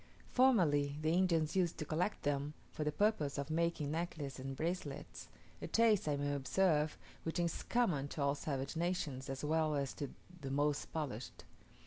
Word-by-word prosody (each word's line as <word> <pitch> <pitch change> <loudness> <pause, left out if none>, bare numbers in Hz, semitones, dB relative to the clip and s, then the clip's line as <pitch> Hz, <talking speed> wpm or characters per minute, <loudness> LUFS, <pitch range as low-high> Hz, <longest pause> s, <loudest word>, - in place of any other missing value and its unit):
Formerly 155 - +4
the 160 +1 +3
Indians 170 -3 +2
used 180 -3 +2
to 155 - -3
collect 170 +7 -1
them, 145 +1 -1 0.2
for 155 - -3
the 150 - +1
purpose 155 -6 +1
of 140 +2 -3
making 165 -3 0
necklaces 155 -5 -3
and 135 +1 -4
bracelets 175 +6 -4 0.3
a - - -3
taste, 225 -6 +4
I 150 - +2
may 145 0 0
observe, 150 +2 +2 0.2
which 165 - -3
is 170 -1 0
common 180 - +1
to 145 0 -3
all 140 0 +3
savage 140 0 -3
nations, 160 -6 -1
as 135 +1 -4
well 155 0 +2
as 140 -2 -1
to 145 -3 -4 0.3
the 135 - -4
most 145 +1 0
polished. 135 -7 -4
155 Hz, 170 wpm, -36 LUFS, 140-170 Hz, 0.3 s, Formerly